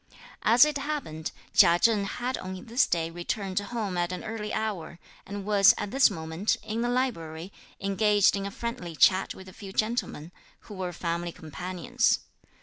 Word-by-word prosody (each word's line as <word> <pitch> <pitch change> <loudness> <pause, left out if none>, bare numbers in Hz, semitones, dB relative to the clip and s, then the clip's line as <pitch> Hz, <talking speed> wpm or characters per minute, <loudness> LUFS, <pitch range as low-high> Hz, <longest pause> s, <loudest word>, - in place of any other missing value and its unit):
As 240 +5 +6
it 300 -1 -1
happened, 275 - -4 0.2
Chia 170 0 +7
Cheng 210 +1 +3
had 245 +5 -3
on 185 0 -7
this 240 +3 +2
day 165 -1 -1
returned 185 +3 -2
home 205 -3 -3
at 175 +1 0
an 180 - -5
early 220 -1 -5
hour, 200 -7 -3 0.3
and 200 0 -6
was, 200 -2 +6
at 205 -1 -4
this 270 0 +5
moment, 160 +5 -2
in 220 +1 -3
the 240 - 0
library, 185 -9 -2 0.3
engaged 200 +1 +3
in 200 0 -3
a - - -4
friendly 195 -6 -5
chat 190 +4 +4
with 190 - -12
a 185 - -11
few 195 0 -9
gentlemen, 215 -7 -2 0.3
who 210 - -12
were 185 -2 -4
family 170 0 -3
companions. 185 - -1
195 Hz, 170 wpm, -27 LUFS, 175-225 Hz, 0.3 s, Chia